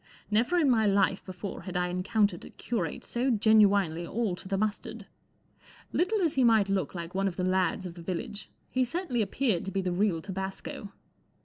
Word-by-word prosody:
Never 235 Hz, +11 st, +2 dB
in 320 Hz, -4 st, +4 dB
my 225 Hz, -4 st, +4 dB
life 195 Hz, -1 st, +2 dB
before 185 Hz, +1 st, -6 dB
had 185 Hz, -2 st, -4 dB
I 180 Hz, 0 st, 0 dB
encountered 185 Hz, +1 st, 0 dB
a -, -, -10 dB
curate 235 Hz, -1 st, -4 dB
so 245 Hz, +3 st, -1 dB
genuinely 205 Hz, -7 st, +4 dB
all 215 Hz, -3 st, -1 dB
to -, -, -10 dB
the 195 Hz, 0 st, -1 dB
mustard. 215 Hz, +1 st, -3 dB, 0.9 s
Little 410 Hz, +4 st, +1 dB
as 325 Hz, -, +2 dB
he 265 Hz, -, +2 dB
might 220 Hz, -4 st, +4 dB
look 195 Hz, -1 st, -1 dB
like 170 Hz, 0 st, -6 dB
one 195 Hz, +1 st, +1 dB
of 185 Hz, -, -3 dB
the 180 Hz, -, -2 dB
lads 185 Hz, 0 st, +1 dB
of 175 Hz, -, -6 dB
the 170 Hz, -, -11 dB
village, 205 Hz, +5 st, -5 dB, 0.2 s
he 255 Hz, -, +2 dB
certainly 255 Hz, -2 st, -1 dB
appeared 215 Hz, -3 st, 0 dB
to 195 Hz, -, -4 dB
be 195 Hz, -, 0 dB
the 180 Hz, -, -1 dB
real 180 Hz, -1 st, +1 dB
tabasco. 190 Hz, +2 st, -6 dB
200 Hz, 195 wpm, -29 LUFS, 185-230 Hz, 0.9 s, in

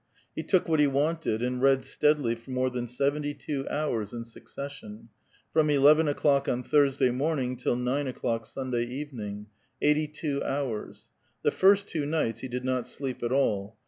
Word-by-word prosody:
He -, -, -2 dB
took 185 Hz, -3 st, +2 dB
what 160 Hz, -2 st, +2 dB
he 150 Hz, -, +5 dB
wanted, 140 Hz, -4 st, 0 dB
and 125 Hz, 0 st, -1 dB
read 135 Hz, -1 st, +4 dB
steadily 145 Hz, -3 st, +2 dB
for 115 Hz, +2 st, -12 dB
more 130 Hz, 0 st, 0 dB
than 125 Hz, -1 st, -3 dB
sev 140 Hz, +4 st, +1 dB
enty 145 Hz, -1 st, -4 dB
two 140 Hz, -2 st, -4 dB
hours 120 Hz, -9 st, -2 dB
in 120 Hz, -1 st, -4 dB
succession, 115 Hz, -2 st, -9 dB, 0.2 s
— -, -, -34 dB
from 155 Hz, -1 st, +3 dB
eleven 150 Hz, +2 st, +5 dB
o'clock 140 Hz, -1 st, +2 dB
on 125 Hz, +1 st, -1 dB
Thurs 140 Hz, -2 st, +3 dB
^a3* 130 Hz, -3 st, +3 dB
morning 135 Hz, -2 st, -1 dB
till 125 Hz, 0 st, 0 dB
nine 130 Hz, +3 st, -1 dB
o'clock 115 Hz, -3 st, -2 dB
Sunday 125 Hz, -3 st, -2 dB
evening, 120 Hz, -6 st, -6 dB, 0.2 s
— -, -, -34 dB
eighty 150 Hz, +1 st, +2 dB
two 150 Hz, -2 st, -3 dB
hours. 135 Hz, -6 st, -4 dB, 0.3 s
The -, -, +3 dB
first 200 Hz, +1 st, +4 dB
two 160 Hz, -, -2 dB
niglits 145 Hz, -7 st, -1 dB
he 130 Hz, -, -5 dB
did 125 Hz, 0 st, -4 dB
not 130 Hz, -2 st, -1 dB
sleep 130 Hz, 0 st, -5 dB
at 120 Hz, -, -1 dB
all. 110 Hz, -6 st, 0 dB
135 Hz, 190 wpm, -28 LUFS, 120-145 Hz, 0.3 s, he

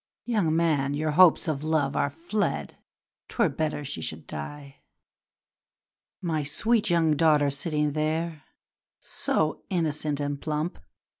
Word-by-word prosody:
Young 205 Hz, -10 st, +1 dB
man! 145 Hz, -4 st, +1 dB
your 155 Hz, +1 st, 0 dB
hopes 175 Hz, +2 st, +5 dB
of 150 Hz, -2 st, -2 dB
love 155 Hz, -3 st, +1 dB
are 140 Hz, -, +1 dB
fled, 165 Hz, -, -2 dB, 0.5 s
'Twere -, -, +2 dB
better 155 Hz, -2 st, -2 dB
she 85 Hz, -, -3 dB
should 80 Hz, 0 st, -3 dB
die! 140 Hz, -, -8 dB, 1.5 s
'My 160 Hz, -3 st, 0 dB
sweet 210 Hz, +10 st, +1 dB
young 165 Hz, -3 st, +3 dB
daughter 150 Hz, -2 st, +4 dB
sitting 150 Hz, +1 st, -1 dB
there, 155 Hz, +1 st, -2 dB, 0.6 s
So 155 Hz, 0 st, -1 dB
innocent 155 Hz, -5 st, -1 dB
and 145 Hz, -1 st, -3 dB
plump! 155 Hz, +3 st, -2 dB
155 Hz, 125 wpm, -27 LUFS, 145-165 Hz, 1.5 s, hopes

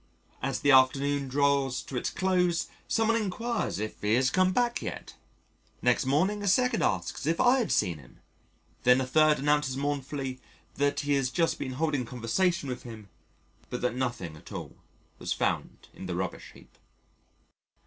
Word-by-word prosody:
As 135 Hz, -1 st, -2 dB
the 145 Hz, -, +4 dB
afternoon 135 Hz, +2 st, +4 dB
draws 140 Hz, -1 st, +1 dB
to 135 Hz, -, -8 dB
its 125 Hz, -, -1 dB
close 180 Hz, -2 st, +1 dB, 0.2 s
someone 225 Hz, 0 st, +2 dB
enquires 230 Hz, +2 st, -2 dB
if 110 Hz, +1 st, -5 dB
he 105 Hz, +2 st, +2 dB
has 130 Hz, +1 st, +2 dB
come 185 Hz, 0 st, +3 dB
back 240 Hz, +4 st, 0 dB
yet; -, -, -6 dB, 0.7 s
next -, -, +2 dB
morning 185 Hz, +10 st, +1 dB
a 200 Hz, -, -3 dB
second 250 Hz, +4 st, +3 dB
asks 145 Hz, -, -1 dB
if 165 Hz, +1 st, +1 dB
I 255 Hz, +2 st, +5 dB
had 235 Hz, -, -1 dB
seen 85 Hz, -4 st, +1 dB
him, 65 Hz, -, -18 dB, 0.6 s
then 125 Hz, +1 st, +5 dB
a 130 Hz, -, 0 dB
third 155 Hz, +3 st, +4 dB
announces 145 Hz, -2 st, +1 dB
mournfully 135 Hz, -2 st, -3 dB, 0.3 s
that 145 Hz, 0 st, 0 dB
he 145 Hz, 0 st, 0 dB
has 135 Hz, -2 st, +1 dB
just 165 Hz, +4 st, 0 dB
been 130 Hz, -2 st, -4 dB
holding 145 Hz, -3 st, -1 dB
conversation 140 Hz, +8 st, 0 dB
with 125 Hz, -2 st, -4 dB
him, 110 Hz, -4 st, -10 dB, 0.6 s
but 125 Hz, -, -4 dB
that 125 Hz, -2 st, 0 dB
nothing 120 Hz, -11 st, -3 dB
at 75 Hz, -, -14 dB
all -, -, -7 dB, 0.4 s
was -, -, -2 dB
found -, -, -2 dB
in 95 Hz, -, -8 dB
the 90 Hz, -, -3 dB
rubbish 95 Hz, 0 st, -5 dB
heap. -, -, -19 dB
140 Hz, 170 wpm, -28 LUFS, 125-175 Hz, 0.7 s, I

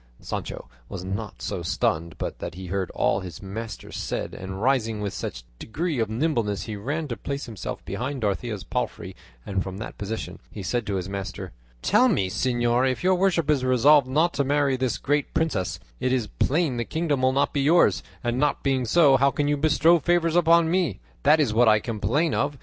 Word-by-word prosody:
Sancho -, -, -5 dB, 0.2 s
was 95 Hz, -2 st, -6 dB
not 100 Hz, +3 st, -5 dB
so -, -, -3 dB
stunned 80 Hz, 0 st, -1 dB
but -, -, -4 dB
that 85 Hz, -, -6 dB
he 95 Hz, +1 st, -7 dB
heard 95 Hz, +1 st, -2 dB
all 95 Hz, -, +2 dB
his 90 Hz, -5 st, -8 dB
master 105 Hz, +3 st, -7 dB
said, -, -, -4 dB
and 95 Hz, +1 st, -6 dB
rising 115 Hz, -3 st, +1 dB
with 100 Hz, -2 st, -3 dB
some -, -, -3 dB, 0.3 s
degree 155 Hz, +4 st, -2 dB
of 110 Hz, -2 st, 0 dB
nimbleness 115 Hz, -5 st, 0 dB
he 110 Hz, -, -5 dB
ran 145 Hz, +10 st, -3 dB
to 120 Hz, -, -3 dB
place 140 Hz, +4 st, -5 dB
himself 110 Hz, -7 st, -6 dB
behind 130 Hz, +7 st, -4 dB
Dorothea's 105 Hz, 0 st, -2 dB
palfrey, -, -, -4 dB, 0.3 s
and 95 Hz, -2 st, -1 dB
from 95 Hz, 0 st, -5 dB
that 110 Hz, -, -8 dB
position 105 Hz, +2 st, -5 dB
he 100 Hz, -, -8 dB
said 120 Hz, +3 st, -1 dB
to 100 Hz, -, -1 dB
his 90 Hz, -1 st, -3 dB
master: 100 Hz, 0 st, -5 dB, 0.3 s
"Tell 255 Hz, -, +4 dB
me, 100 Hz, -, +1 dB
señor; 120 Hz, +3 st, +1 dB
if 130 Hz, -, -5 dB
your 185 Hz, +1 st, +4 dB
worship 180 Hz, -4 st, +2 dB
is 145 Hz, -4 st, +2 dB
resolved 130 Hz, +2 st, +5 dB
not 155 Hz, +6 st, +2 dB
to 140 Hz, -, +1 dB
marry 140 Hz, 0 st, +2 dB
this 130 Hz, -2 st, -1 dB
great 145 Hz, +1 st, 0 dB
princess, 95 Hz, -, 0 dB, 0.2 s
it 130 Hz, 0 st, 0 dB
is 125 Hz, -3 st, +1 dB
plain 140 Hz, -, 0 dB
the 120 Hz, -, 0 dB
kingdom 155 Hz, -1 st, -1 dB
will 130 Hz, 0 st, +4 dB
not 140 Hz, +2 st, +1 dB
be 140 Hz, -, +1 dB
yours; 135 Hz, -, +4 dB, 0.2 s
and 120 Hz, +1 st, -1 dB
not 145 Hz, 0 st, +1 dB
being 135 Hz, -2 st, +1 dB
so, 140 Hz, +1 st, +5 dB
how 135 Hz, +2 st, +4 dB
can 145 Hz, +1 st, -1 dB
you 145 Hz, -, +2 dB
bestow 160 Hz, +3 st, +4 dB
favours 170 Hz, 0 st, +1 dB
upon 170 Hz, -1 st, +4 dB
me? 175 Hz, -, 0 dB, 0.2 s
That 150 Hz, +2 st, +5 dB
is 135 Hz, -8 st, +2 dB
what 120 Hz, +2 st, +4 dB
I 110 Hz, 0 st, +5 dB
complain 120 Hz, +9 st, 0 dB
of. 145 Hz, 0 st, 0 dB
130 Hz, 205 wpm, -25 LUFS, 105-150 Hz, 0.3 s, resolved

